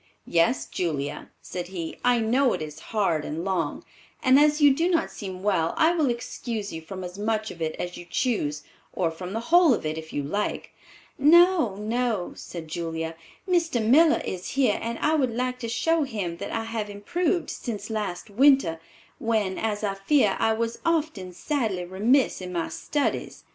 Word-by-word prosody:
"Yes, 170 +9 +2
Julia," 150 -6 -3
said 180 -1 -5
he, 175 -3 -6
"I 245 -1 +4
know 245 +4 +2
it - - -3
is 150 0 -8
hard 190 -8 +1
and 160 +4 -4
long, 175 -6 -1 0.4
and 260 +2 +6
as 300 +1 +4
you 290 -2 +7
do 330 +6 +1
not 330 -2 +1
seem 190 -3 -7
well, 175 -6 +1
I 320 +1 +5
will 310 -6 +2
excuse 235 -3 -4
you 160 - -5
from 185 +3 -7
as 180 +2 -7
much 215 +1 -1
of 170 - -11
it 160 -1 -1
as 175 0 -5
you 175 - -10
choose, 150 - -1 0.3
or 170 -3 0
from 180 +3 -7
the 225 - -1
whole 345 -7 +7
of - - -7
it, 155 +1 -2
if 160 0 -10
you 145 - -2
like." 200 +9 -3 0.5
"No, 330 - +5
no," 220 -2 -1
said 165 -2 -8
Julia; 165 0 -4 0.3
"Mr. 335 -8 +2
Miller 300 +9 +5
is 185 -1 -4
here 255 -7 +3
and 230 +1 -3
I 305 - +1
would 260 -7 +1
like 250 +1 -1
to 230 -2 -4
show 320 +9 +1
him 205 - -3
that - - -6
I 225 - -2
have 225 -2 -4
improved 340 - -1
since 215 -3 -5
last 210 -2 -4
winter, 255 - +4 0.4
when, 215 -4 0
as 215 -1 -2
I 200 -2 0
fear, 195 +1 +2
I 225 - +3
was 230 +1 -2
often 315 - -1
sadly 210 - -2
remiss 215 +8 +2
in 180 0 -6
my 170 -2 -2
studies. 275 - -2
215 Hz, 185 wpm, -26 LUFS, 180-260 Hz, 0.5 s, you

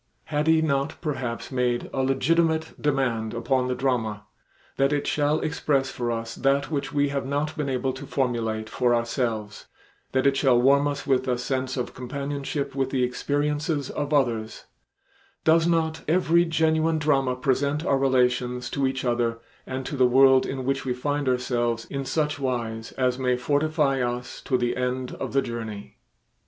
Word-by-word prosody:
Had 150 +1 +1
he 160 0 +4
not 140 0 -1
perhaps 130 -7 -4
made 125 -2 0
a 135 - 0
legitimate 160 +4 +1
demand 125 -6 0
upon 125 +2 0
the 125 - -1
drama, 115 -5 -1 0.5
that 135 +1 +3
it 145 -1 0
shall 150 +1 +1
express 140 -3 0
for 120 -1 -3
us 115 0 -4
that 140 +3 +1
which 140 -2 -2
we 145 -1 +1
have 140 -1 -2
not 145 +2 -1
been 150 -2 -2
able 130 0 -1
to 135 +2 -8
formulate 115 -5 -1
for 120 +2 +1
ourselves, 115 -3 -2 0.4
that 130 0 +1
it 140 0 +4
shall 130 -3 +4
warm 140 +3 +4
us 145 0 -3
with 130 -1 +1
a 125 -1 +1
sense 130 +1 -2
of 125 - -3
companionship 140 +2 -4
with 135 -1 -1
the 130 -2 0
experiences 145 +3 -1
of 145 0 -3
others; 115 -6 0 0.8
does 165 +1 +4
not 160 -1 +1
every 170 +1 +3
genuine 160 0 +2
drama 135 -4 +1
present 140 +4 0
our 135 - +2
relations 125 -2 +1
to 140 -2 +1
each 130 0 -3
other 120 -1 0 0.3
and 130 0 -4
to - - -4
the 130 -2 +4
world 130 +1 +5
in 130 -1 -4
which 135 +1 0
we 125 -2 -2
find 145 +1 -1
ourselves 120 -2 0
in 140 -1 -2
such 150 +2 -1
wise 115 -4 -3
as 125 -1 0
may 125 -1 +1
fortify 145 +1 +1
us 125 0 -3
to 130 - 0
the 120 0 0
end 125 0 -2
of - - -4
the 135 -1 +3
journey? 110 -4 -6
135 Hz, 170 wpm, -25 LUFS, 125-145 Hz, 0.8 s, world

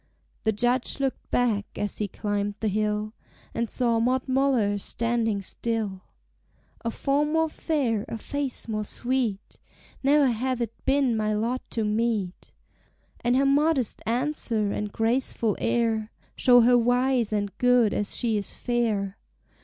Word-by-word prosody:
The 220 - +4
Judge 245 +5 0
looked 270 -1 -2
back 220 -5 0
as 205 - -2
he 210 - 0
climbed 205 0 -2
the 220 - 0
hill, 210 +1 -1 0.4
And 230 -1 -2
saw 235 -3 +1
Maud 255 +3 +1
Muller 255 -6 +2
standing 225 -2 -1
still: 215 -3 -3 0.8
"A 230 - 0
form 285 +5 0
more 320 0 +3
fair, 265 -9 -1
a 230 - -5
face 275 +2 -3
more 215 -1 -2
sweet, 240 -3 -2 0.4
Ne'er 285 +1 +4
hath 255 +1 0
it 230 -2 -2
been 270 -3 +2
my 215 -1 0
lot 235 +4 -1
to 225 - -1
meet. 210 -4 -1 0.7
"And 240 +1 +2
her 275 +1 +3
modest 280 -3 +2
answer 235 -4 0
and 210 0 -3
graceful 225 -1 0
air 230 -2 0 0.2
Show 245 -2 +6
her 245 +1 +5
wise 245 -1 +2
and 205 -2 -2
good 245 -4 +4
as 205 - -1
she 230 -3 +1
is 200 -2 -4
fair. 220 -5 -1
230 Hz, 145 wpm, -26 LUFS, 215-255 Hz, 0.8 s, Show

